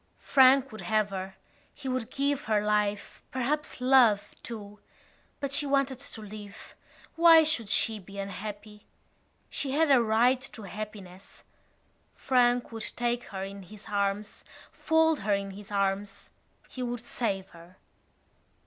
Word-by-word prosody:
Frank 270 0 +5
would 215 - -8
save 215 -1 +1
her. 190 0 -5 0.4
He 280 - -8
would 255 -3 -2
give 280 +1 -1
her 215 -1 +2
life, 210 -1 -1
perhaps 275 +4 -2
love, 250 -5 +4
too. 210 -3 -8 0.6
But 280 -1 -3
she 285 0 +3
wanted 275 -2 +1
to 270 -5 -9
live. 210 0 -10 0.4
Why 330 -1 +8
should 250 -9 -1
she 220 0 +1
be 200 +1 -12
unhappy? 205 +1 -7 0.6
She 270 -2 -3
had 310 0 +3
a 260 -3 +6
right 235 +3 +3
to 220 - -10
happiness. 200 -2 -9 0.7
Frank 245 -2 +2
would 225 -1 -6
take 240 0 -1
her 190 -2 -6
in 195 +1 -7
his 205 +3 -13
arms, 200 0 -2 0.3
fold 320 -1 +2
her 205 0 +1
in 200 0 -4
his 200 +1 -11
arms. 200 0 -2 0.4
He 255 - -8
would 245 -1 -3
save 195 -6 -2
her. 170 +2 -16
220 Hz, 140 wpm, -28 LUFS, 200-260 Hz, 0.7 s, Why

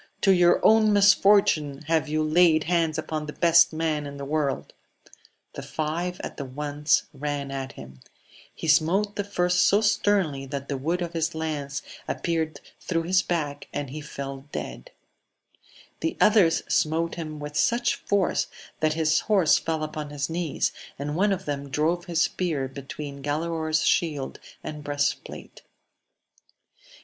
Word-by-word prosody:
to 195 - +4
your 175 -1 +5
own 220 0 +6
mMortune 195 -8 +4
have 160 0 +1
you 155 +1 0
laid 155 0 +4
hands 165 -2 +1
upon 155 -1 -3
the 150 - -6
best 170 -1 +5
man 155 -2 -1
in 140 0 -8
the 140 - -6
world! 145 -1 -2 0.8
The - - -6
five 170 +4 -3
at - - -6
once 145 +2 0
ran 145 0 -4
at 135 0 -5
him; 65 -2 -12 0.6
he - - -6
smote 180 +7 +3
the 205 - -1
first 180 -2 +1
so 200 - +4
sternly, 205 -10 +1
that 140 0 -5
the 140 - -2
wood 170 +6 -1
of 170 0 -5
his 165 -1 -1
lance 145 -3 -3 0.2
appeared 165 -2 -2 0.2
through 165 -2 -1
his 185 +2 +3
back, 150 -5 -3
and 145 -3 -4
he 155 +2 -6
fell 135 -2 -7
dead; - - -6 1.1
the 325 - -2
others 195 -6 +4
smote 165 +2 +1
him 155 -3 -6
with 150 0 -7
such 235 +11 +2
force 200 -3 0 0.3
that 155 0 +2
his 160 0 +2
horse 195 -8 +3
fell 160 -1 -2
upon 155 -1 -5
his 145 +2 -3
knees, 165 -2 -1 0.3
and 145 +2 -4
one 200 +4 +2
of 195 - -2
them 140 -1 -4
drove 160 +5 0
his 170 -2 +1
spear 155 -7 -1
between 140 +1 -8
Galaor's 160 +2 -1
shield 150 -6 0 0.2
and 150 -1 -6
breast 145 0 0
plate. - - -11
155 Hz, 155 wpm, -25 LUFS, 145-175 Hz, 1.1 s, own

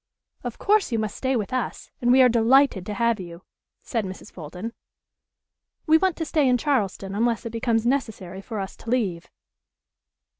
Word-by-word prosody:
"Of 245 -2 -5
course 415 -6 +2
you 230 - +1
must 215 -2 -2
stay 265 0 0
with 215 0 -2
us, 255 -1 -3
and 245 0 +3
we 260 +1 +7
are - - +7
delighted 235 -3 +4
to 210 - -3
have 235 0 +1
you," 170 -1 -9 0.4
said 230 -3 -2
Mrs. 185 -1 -8
Fulton. 180 +7 -7 1.1
"We 320 0 +5
want 375 -2 +1
to 325 - -2
stay 300 -4 +2
in 250 - +4
Charleston 205 -8 -1
unless 230 +2 0
it 230 - -4
becomes 230 0 0
necessary 210 -8 -2
for 220 +1 -5
us 195 0 -5
to 225 - -9
leave." 195 -9 -1
230 Hz, 180 wpm, -24 LUFS, 195-255 Hz, 1.1 s, we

